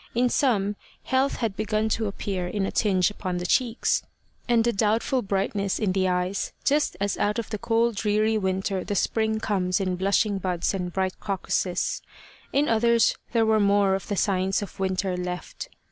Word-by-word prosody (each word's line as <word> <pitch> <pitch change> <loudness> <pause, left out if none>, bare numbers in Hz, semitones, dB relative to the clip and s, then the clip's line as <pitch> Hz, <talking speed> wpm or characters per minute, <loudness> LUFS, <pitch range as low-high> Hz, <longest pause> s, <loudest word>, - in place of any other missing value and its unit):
In 245 +1 +3
some, 205 -7 +1 0.3
health 265 +2 +1
had 225 -5 -2
begun 215 +1 0
to 220 0 0
appear 195 -2 -3
in 195 +1 -1
a - - -3
tinge 190 -3 +2
upon 185 -3 -4
the 175 - -4
cheeks, 235 +4 +1 0.5
and 235 -1 +4
a 235 - +2
doubtful 220 +5 +1
brightness 195 -1 -1
in 210 -4 0
the 190 0 +1
eyes, 180 +2 -1
just 290 -9 +1
as 200 0 -1
out 210 0 +1
of 230 - -4
the 215 - -3
cold 230 -1 +1
dreary 215 +1 +1
winter 190 -1 -1
the 205 - -3
spring 220 +3 +1
comes 190 -3 0
in 185 -2 -1
blushing 200 +2 +1
buds 180 -1 -1
and 180 -2 -3
bright 190 0 -2
crocuses. 195 - -1 0.5
In 290 +2 +2
others 230 +1 +3 0.2
there 230 -2 +3
were 220 0 +3
more 200 -1 +3
of 190 -1 -3
the 205 - -2
signs 190 +1 +1
of 200 - -10
winter 190 0 0
left. 180 - -5
200 Hz, 180 wpm, -25 LUFS, 190-225 Hz, 0.5 s, and